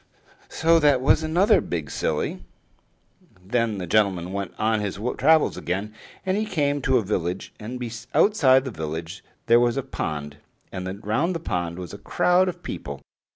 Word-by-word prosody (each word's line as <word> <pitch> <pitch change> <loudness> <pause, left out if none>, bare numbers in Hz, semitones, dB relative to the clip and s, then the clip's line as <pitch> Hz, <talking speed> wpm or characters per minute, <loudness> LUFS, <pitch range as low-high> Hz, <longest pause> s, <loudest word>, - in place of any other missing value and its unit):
So 165 +1 +3
that 145 -4 +4
was 135 +4 +3
another 175 +7 +3
big 80 -5 -4
silly. - - -2 1.0
Then 115 0 0
the 90 - -4
gentleman 95 -2 +1
went 100 -3 -3
on 110 0 +1
his 100 -2 -3 0.2
travels 155 +3 +4
again; 100 +5 -3 0.3
and 190 0 +1
he 215 - 0
came 145 -7 0
to 130 -1 +3
a 115 - +1
village, 90 -2 -3
and 120 +4 -6 0.4
outside 135 -11 +5
the 130 - -4
village 80 +2 -6 0.2
there 120 0 +6
was 120 +1 +2
a 135 - -1
pond, 75 - -5 0.3
and 95 +2 -6
round 150 - 0
the - - -2
pond 85 - -3
was 90 -3 -7
a - - -8
crowd 180 +1 +2
of 180 - -8
people. 70 -1 -6
110 Hz, 165 wpm, -24 LUFS, 90-145 Hz, 1.0 s, there